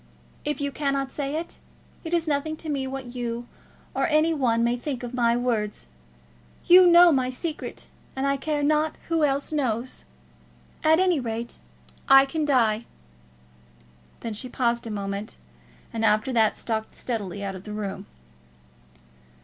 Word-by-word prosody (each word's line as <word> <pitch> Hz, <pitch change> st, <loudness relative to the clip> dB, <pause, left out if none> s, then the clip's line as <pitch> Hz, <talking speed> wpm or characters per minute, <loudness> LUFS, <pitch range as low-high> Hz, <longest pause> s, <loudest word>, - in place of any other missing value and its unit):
If 295 Hz, +1 st, -2 dB
you 285 Hz, -1 st, -1 dB
cannot 275 Hz, -2 st, -1 dB
say 285 Hz, 0 st, -3 dB
it, 330 Hz, +2 st, -5 dB, 0.4 s
it 325 Hz, -, -6 dB
is 340 Hz, -1 st, +1 dB
nothing 310 Hz, +1 st, -1 dB
to 315 Hz, -, -7 dB
me 275 Hz, -2 st, -1 dB
what 265 Hz, -2 st, -6 dB
you 240 Hz, -1 st, -4 dB, 0.5 s
or -, -, +1 dB
any 315 Hz, +1 st, +3 dB
one 235 Hz, -6 st, +1 dB
may 235 Hz, +1 st, +2 dB
think 250 Hz, 0 st, -5 dB
of 245 Hz, 0 st, -6 dB
my 235 Hz, -1 st, +2 dB
words. 225 Hz, -4 st, -1 dB, 0.8 s
You 360 Hz, +1 st, +8 dB
know 345 Hz, 0 st, +8 dB
my 260 Hz, -3 st, +1 dB
secret, 305 Hz, +5 st, -5 dB, 0.3 s
and 265 Hz, +1 st, -1 dB
I 275 Hz, 0 st, +2 dB
care 295 Hz, +1 st, -2 dB
not 305 Hz, +1 st, +2 dB
who 330 Hz, -2 st, +2 dB
else 280 Hz, 0 st, +1 dB
knows 255 Hz, -4 st, -2 dB, 0.8 s
it. -, -, +1 dB
At 320 Hz, +2 st, +6 dB
any 365 Hz, -4 st, +3 dB
rate, 235 Hz, -1 st, -4 dB, 0.5 s
I 270 Hz, 0 st, +8 dB
can 305 Hz, +2 st, -2 dB
die!" 235 Hz, -5 st, +2 dB, 1.4 s
Then 230 Hz, -, -4 dB
she 250 Hz, +5 st, -5 dB
paused 235 Hz, -2 st, 0 dB
a -, -, -5 dB
moment, 200 Hz, 0 st, -4 dB, 0.6 s
and 225 Hz, -, -2 dB
after 215 Hz, +4 st, +2 dB
that 220 Hz, -2 st, +3 dB
stalked 220 Hz, -1 st, -3 dB
steadily 205 Hz, -5 st, -4 dB
out 195 Hz, -1 st, -3 dB
of 185 Hz, -1 st, -9 dB
the 210 Hz, -, -8 dB
room. 210 Hz, -2 st, -5 dB
260 Hz, 160 wpm, -25 LUFS, 230-300 Hz, 1.4 s, You